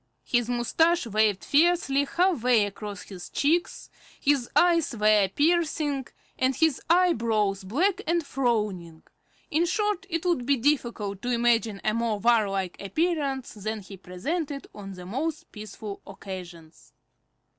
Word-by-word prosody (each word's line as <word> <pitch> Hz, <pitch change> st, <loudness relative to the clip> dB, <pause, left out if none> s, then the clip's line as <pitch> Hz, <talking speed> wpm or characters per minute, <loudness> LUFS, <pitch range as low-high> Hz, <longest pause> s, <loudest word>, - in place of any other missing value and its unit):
His 240 Hz, -1 st, 0 dB
moustache 320 Hz, +8 st, +2 dB
waved 215 Hz, -2 st, +1 dB
fiercely 290 Hz, -3 st, +3 dB
half 350 Hz, -2 st, +1 dB
way 240 Hz, -3 st, +4 dB
across 205 Hz, 0 st, -7 dB
his 180 Hz, -3 st, -10 dB
cheeks, 325 Hz, +5 st, 0 dB, 0.3 s
his 275 Hz, -4 st, +1 dB
eyes 335 Hz, -8 st, +3 dB
were 210 Hz, -1 st, +4 dB
piercing, 295 Hz, -, 0 dB, 0.3 s
and 260 Hz, 0 st, +2 dB
his 320 Hz, -2 st, +2 dB
eyebrows 225 Hz, -, +2 dB
black 350 Hz, -, 0 dB
and 335 Hz, -1 st, +1 dB
frowning; 210 Hz, -12 st, -2 dB, 0.5 s
in 330 Hz, +3 st, +2 dB
short, 415 Hz, 0 st, -1 dB
it 330 Hz, 0 st, -2 dB
would 330 Hz, -9 st, 0 dB
be 280 Hz, -1 st, +3 dB
difficult 235 Hz, -7 st, -1 dB
to 245 Hz, -, -3 dB
imagine 235 Hz, -4 st, +1 dB
a 215 Hz, -, +1 dB
more 230 Hz, -1 st, 0 dB
warlike 200 Hz, -5 st, +1 dB
appearance 280 Hz, -, -1 dB
than 215 Hz, +1 st, -4 dB
he 195 Hz, 0 st, -11 dB
presented 275 Hz, -, -4 dB
on 195 Hz, -2 st, -8 dB
the 180 Hz, -1 st, -10 dB
most 285 Hz, -, -4 dB
peaceful 210 Hz, -1 st, -8 dB
occasions. 180 Hz, -4 st, -10 dB
240 Hz, 135 wpm, -26 LUFS, 205-310 Hz, 0.5 s, way